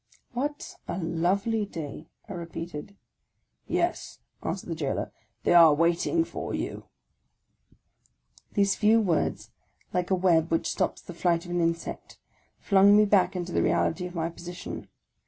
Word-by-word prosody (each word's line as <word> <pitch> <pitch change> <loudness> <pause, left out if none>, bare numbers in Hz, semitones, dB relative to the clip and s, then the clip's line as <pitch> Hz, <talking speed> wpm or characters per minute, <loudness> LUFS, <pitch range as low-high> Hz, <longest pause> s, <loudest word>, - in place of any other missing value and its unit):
" - - -42
What 290 +1 -4
a - - -3
lovely 190 +6 0
day! 160 -5 -7
" - - -38
I 200 - -6
repeated. 170 +1 -7 0.4
" - - -51 0.3
Yes," 350 0 -1 0.2
answered 190 - -4
the - - -1
jailor; 150 -4 -2 0.2
" 110 - -47
they - - +3
are 165 -3 +8
waiting 170 - +2
for - - -5
you" - - -4 1.7
These 200 -1 +3
few 220 +2 +4
words, 180 -8 0 0.4
like 180 -1 0
a' 190 - +3
web 170 -3 +3
which 165 - +1
stops - - -1
the 175 - -9
flight 170 0 +1
of 175 - -8
an 175 0 +1
insect, 165 0 -3 0.4
flung 200 0 +5
me 210 - +6
back 200 -2 +3
into 180 -1 -3
the - - +1
reality 180 +2 +1
of 180 - -11
my 165 0 -1
position. 175 +1 -8
175 Hz, 160 wpm, -27 LUFS, 165-200 Hz, 1.7 s, are